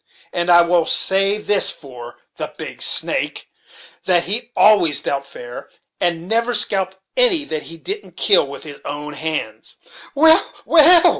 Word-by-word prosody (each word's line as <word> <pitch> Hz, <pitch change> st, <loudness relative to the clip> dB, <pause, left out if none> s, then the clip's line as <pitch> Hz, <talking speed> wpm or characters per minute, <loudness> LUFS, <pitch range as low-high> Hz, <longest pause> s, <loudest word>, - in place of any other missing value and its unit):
And 175 Hz, 0 st, -2 dB
I 175 Hz, 0 st, +6 dB
will 170 Hz, -1 st, 0 dB
say 195 Hz, +2 st, +1 dB
this 205 Hz, -1 st, 0 dB
for 120 Hz, -4 st, -10 dB, 0.2 s
the -, -, -6 dB
'Big -, -, -9 dB
Snake,' -, -, +1 dB, 0.6 s
that 175 Hz, -2 st, +2 dB
he 225 Hz, +5 st, -2 dB
always 200 Hz, -8 st, +3 dB
dealt 140 Hz, 0 st, -4 dB
fair, 120 Hz, -2 st, -11 dB, 0.3 s
and 170 Hz, -1 st, -2 dB
never 230 Hz, +3 st, 0 dB
scalped 190 Hz, -1 st, -2 dB, 0.2 s
any 475 Hz, -11 st, +3 dB
that 155 Hz, -, -5 dB
he 165 Hz, -, -10 dB
didn't 405 Hz, -, -7 dB
kill 275 Hz, -, +3 dB
with 140 Hz, -, -10 dB
his 145 Hz, -2 st, -11 dB
own 150 Hz, +1 st, -7 dB
hands." 160 Hz, +1 st, -6 dB, 0.4 s
"Well, 320 Hz, +3 st, +5 dB
well!" 335 Hz, +1 st, +6 dB
180 Hz, 150 wpm, -18 LUFS, 155-230 Hz, 0.6 s, I